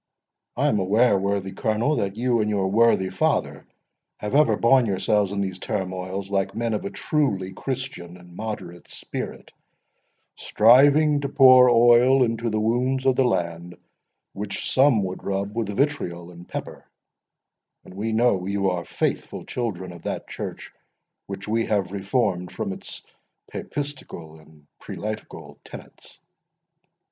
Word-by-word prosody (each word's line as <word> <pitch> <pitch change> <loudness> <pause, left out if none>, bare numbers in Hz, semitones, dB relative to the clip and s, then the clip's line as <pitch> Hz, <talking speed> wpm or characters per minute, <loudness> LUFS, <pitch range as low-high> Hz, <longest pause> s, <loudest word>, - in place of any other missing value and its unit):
I - - +1
am 105 - +2
aware, 105 +4 +3
worthy 100 0 -1
Colonel, 115 +10 0
that 100 0 -2
you 120 +1 +1
and 105 - 0
your 95 -2 0
worthy 110 -4 +3
father - - -1 0.5
have 105 - -5
ever 150 +2 +4
borne 125 0 +4
yourselves 100 0 +1
in 100 0 -2
these 95 -2 -4
turmoils 95 -1 -4
like 95 -1 -1
men 115 0 -1
of 105 - -3
a - - -2
truly 100 -13 -1
Christian 125 -9 -6
and 90 -1 -16
moderate 105 -5 -7
spirit, - - -7 0.8
striving 145 +6 +4
to 140 - -3
pour 130 -2 +7
oil 120 +2 +5
into 115 0 -1
the 110 0 -1
wounds 125 +4 0
of 130 -1 +3
the 135 - +3
land, 85 -6 -2 0.6
which 100 0 -4
some 130 -6 +4
would 95 0 -5
rub 100 +1 -3
with 115 -3 -2
vitriol 100 - -2
and 85 0 -14
pepper: - - -7 1.0
and - - -13
we 105 +4 -3
know 110 -5 +1
you 100 -1 0
are 90 -1 -3
faithful - - -3
children 95 -7 -4
of 85 -1 -12
that - - -5
church - - -7 0.5
which 100 0 -7
we 115 +1 0
have 100 -4 0
reformed 100 -2 -1
from 95 - -4
its - - -10 0.5
papistical 135 - -6
and 75 -1 -20
prelatical 110 +1 -7
tenets." - - -13
105 Hz, 145 wpm, -24 LUFS, 95-120 Hz, 1.0 s, pour